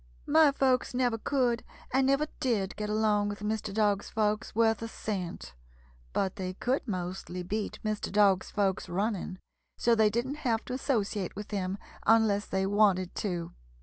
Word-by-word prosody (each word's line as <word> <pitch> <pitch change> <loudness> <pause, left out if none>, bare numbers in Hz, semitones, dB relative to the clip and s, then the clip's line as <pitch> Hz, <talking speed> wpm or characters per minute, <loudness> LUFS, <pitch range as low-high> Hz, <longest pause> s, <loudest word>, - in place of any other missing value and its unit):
"My 310 -1 +6
folks 260 -2 +1
never 245 -3 +1
could 245 -2 +1 0.3
and 265 0 +3
never 275 +2 +3
did 215 -7 0
get 210 0 -4
along 210 -1 +2
with 205 0 -6
Mr. 210 0 -2
Dog's 205 -1 +1
folks 215 -1 -1
worth 225 -1 +3
a 230 - -3
cent, 185 - -5 0.6
but 190 - -1
they 185 -1 -4
could 255 +6 -1
mostly 180 -2 -4
beat 205 +4 -3
Mr. 215 -1 -2
Dog's 200 -3 +4
folks 195 -3 0
running, 195 0 -2 0.4
so 235 - +3
they 220 -2 +5
didn't 240 +7 -2
have 235 -6 -1
to 250 - -5
associate 215 -8 -1
with 210 +2 -7
him 195 -1 -2 0.3
unless 220 -2 +4
they 190 0 0
wanted 195 -3 +3
to." 175 -5 -3
210 Hz, 160 wpm, -30 LUFS, 195-230 Hz, 0.6 s, My